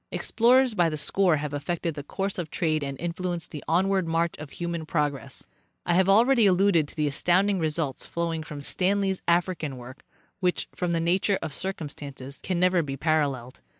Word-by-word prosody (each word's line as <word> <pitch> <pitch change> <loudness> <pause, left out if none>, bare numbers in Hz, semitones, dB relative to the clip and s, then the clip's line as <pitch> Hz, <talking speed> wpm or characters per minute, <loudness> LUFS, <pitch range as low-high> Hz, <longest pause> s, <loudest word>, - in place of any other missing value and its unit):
Explorers 250 +2 +3
by 175 -5 +3
the 155 - -4
score 180 +2 +2
have 145 0 -4
affected 165 +3 -2
the 145 - -6
course 195 +7 -3
of 165 -3 -4
trade 155 -3 0
and 140 -1 -5
influenced 175 0 -3
the 150 - -7
onward 190 +1 +2
march 165 +1 +1
of 155 -1 -8
human 170 0 -4
progress. 150 -4 -2 0.4
I 175 - +1
have 190 +2 +3
already 230 +2 +5
alluded 185 -4 +3
to - - -12
the 150 -1 +1
astounding 185 +7 +2
results 155 -3 -2
flowing 165 -1 -2
from 150 -2 -8
Stanley's 195 +3 0
African 170 -5 0
work, 125 +2 -11 0.4
which, 180 -2 0
from 180 - -2
the 165 - +1
nature 185 +4 +2
of 155 -3 -4
circumstances, 145 -6 -5
ean 180 -2 +1
never 180 -1 +3
be 135 -3 -5
paralleled. 140 -5 0
170 Hz, 180 wpm, -26 LUFS, 150-185 Hz, 0.4 s, already